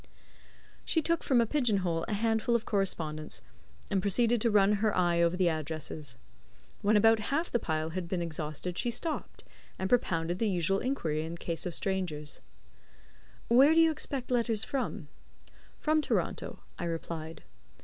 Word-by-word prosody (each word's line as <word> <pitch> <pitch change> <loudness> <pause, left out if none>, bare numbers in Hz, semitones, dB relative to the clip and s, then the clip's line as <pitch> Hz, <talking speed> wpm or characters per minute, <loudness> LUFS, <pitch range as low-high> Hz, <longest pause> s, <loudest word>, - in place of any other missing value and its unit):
She 325 - +1
took 335 +1 +1
from 255 -3 +3
a - - +3
pigeon 245 -4 +1
hole 165 -1 0
a - - -2
handful 225 +2 +1
of 230 - 0
correspondence, 160 -6 -2 0.5
and 195 -2 +2
proceeded 225 +4 +2
to 235 - +3
run 205 -1 +4
her 215 -3 +1
eye 175 -1 +3
over 170 +1 +2
the 185 -1 +3
addresses. 155 -3 -4 0.7
When 210 +1 +4
about 225 +1 +5
half 320 +6 0
the 240 - +2
pile 160 -4 -2
had 180 0 -4
been 180 +1 -2
exhausted 160 +1 -4
she 240 - 0
stopped, 310 +7 -3 0.3
and 190 - -2
propounded 175 -7 +1
the 225 - +1
usual 190 +1 +1
inquiry 160 - -1
in 165 +1 -5
the - - -7
case 170 +1 -3
of 175 - -2
strangers: 175 -7 -2 1.1
"Where 270 +7 +6
do - - +6
you 325 -1 +6
expect 275 -4 -4
letters 230 -3 +2
from?" 220 - -3 0.7
"From 310 0 +2
Toronto," - - -2 0.2
I 175 - -2
replied. 165 -1 -5
195 Hz, 165 wpm, -30 LUFS, 165-235 Hz, 1.1 s, Where